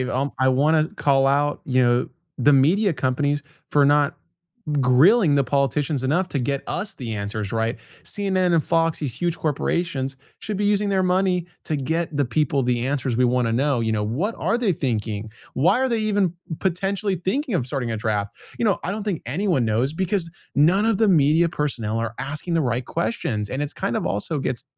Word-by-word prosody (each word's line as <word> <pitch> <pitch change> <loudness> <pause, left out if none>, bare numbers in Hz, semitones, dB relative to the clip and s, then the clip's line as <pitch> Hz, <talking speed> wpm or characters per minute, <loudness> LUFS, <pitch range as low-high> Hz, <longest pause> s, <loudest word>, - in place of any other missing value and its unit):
um, 130 +2 -2
I 130 0 +3
wanna 155 +4 +3
call 135 -1 +2
out, 145 +1 +1
you 130 -1 +2
know, 120 0 +2 0.3
the 145 +3 +4
media 170 +9 +4
companies 145 +2 0 0.3
for 145 -1 +4
not 145 0 +3 0.7
grilling 145 - +5
the 140 - +3
politicians 140 +1 0
enough 155 +8 +1
to 145 - -3
get 140 +2 -1
us 200 +4 -3
the 115 -4 -6
answers, 100 0 -4
right? 115 +1 -1 0.3
CNN 185 -3 0
and 160 - +2
Fox, 165 -1 +1
these 140 -6 -3
huge 170 +5 -1
corporations, 145 -2 -1 0.2
should 210 -1 -4
be 205 - -1
using 205 0 +2
their 190 -1 +1
money 180 -1 +1 0.2
to 155 - -1
get 160 +3 -2
the 145 - +2
people 140 +2 0
the 120 0 0
answers 135 -3 -1
we 125 +2 +3
wanna 120 -2 +1
know, 135 +1 +1
you 110 -1 0
know, 105 - 0
what 145 - -1
are 230 - +1
they 230 -6 +1
thinking? 110 -7 -3 0.2
Why 170 - +3
are 265 - +2
they 230 - +1
even 205 -5 +1 0.3
potentially 195 +2 -1
thinking 210 - -2
of 130 -8 0
starting 125 -3 -3
a 110 - -2
draft? 105 -2 -2 0.2
You - - 0
know, 205 -4 +2
I - - -2
don't 210 +1 -3
think 200 -6 -2
anyone 155 - 0
knows 115 +6 +1
because 180 0 -1 0.2
none 180 +9 +4
of 225 -3 +2
the 220 0 +3
media 160 0 +4
personnel 115 -9 -2
are 115 -1 -3
asking 145 +6 -3
the 165 - +2
right 125 0 -1
questions, 125 - -2
and 135 - -3
it's 145 +1 -3
kind 120 - -1
of - - -3
also 105 - -2
gets 130 -2 -3
145 Hz, 200 wpm, -23 LUFS, 125-180 Hz, 0.7 s, grilling